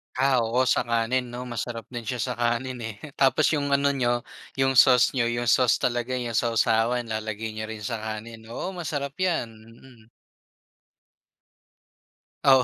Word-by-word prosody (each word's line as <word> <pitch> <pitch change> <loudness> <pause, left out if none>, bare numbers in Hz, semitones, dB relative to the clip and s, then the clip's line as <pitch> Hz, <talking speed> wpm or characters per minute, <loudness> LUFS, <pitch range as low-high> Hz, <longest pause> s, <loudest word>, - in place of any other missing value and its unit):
Ah, 130 0 +3
oo 115 +2 +1
sa 130 - +3
kanin 120 +2 0
'no 120 +1 -6
masarap 120 -1 -5
din 120 - -4
siya 125 -2 -1
sa 125 - -2
kanin, 120 +2 -1
eh. 115 -2 -5 0.2
Tapos 135 +3 +4
yung 145 -3 0
ano 140 0 +2
niyo 120 -3 0 0.3
yung 135 0 +2
sauce 125 -2 +6
niyo 120 -3 +1
yung 120 0 -1
sauce 125 -3 +4
talaga 120 +1 -1
yung 120 -2 -3
sawsawan 115 +1 +2
lalagay 110 -1 -4
niyo 110 0 -5
rin 110 -1 -7
sa 115 +1 -3
kanin, 110 +1 -7
oo 120 +11 -5
masarap 150 -6 -4
yan, 170 -11 0 0.2
mm. 120 -3 -18 2.4
Oo. 130 -2 +6
120 Hz, 155 wpm, -25 LUFS, 115-130 Hz, 2.4 s, sauce